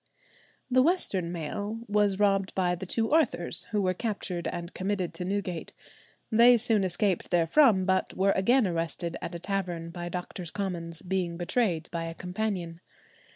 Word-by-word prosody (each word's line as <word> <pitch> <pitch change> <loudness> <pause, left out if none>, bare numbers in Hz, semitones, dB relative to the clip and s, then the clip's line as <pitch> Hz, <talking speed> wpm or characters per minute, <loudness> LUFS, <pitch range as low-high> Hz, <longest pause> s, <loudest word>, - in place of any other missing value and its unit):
The 255 +1 +5
western 230 - +1
mail 205 +7 -4
was 205 -1 +2
robbed 195 -2 +1
by 180 -2 +1
the 180 +2 -5
two 225 +5 0
Arthurs, 320 +1 +1
who 210 -3 -1
were 185 -1 +2
captured 185 -5 -3
and 170 0 -5
committed 190 -2 -2
to 180 - -5
Newgate. 190 -3 -3 0.6
They 235 +2 +7
soon 225 -3 +3
escaped 185 0 0
therefrom, 190 - +4
but 190 0 0
were 195 +1 +3
again 235 +7 +3
arrested 170 -1 -2
at 175 - -5
a - - -5
tavern 175 -3 -3
by 175 0 -5
Doctors' 180 -1 -5
Commons, 170 -3 -3
being 180 -2 -2
betrayed 175 -2 0
by 165 -1 -3
a 165 0 -6
companion. 180 -3 -3
185 Hz, 155 wpm, -28 LUFS, 175-205 Hz, 0.6 s, They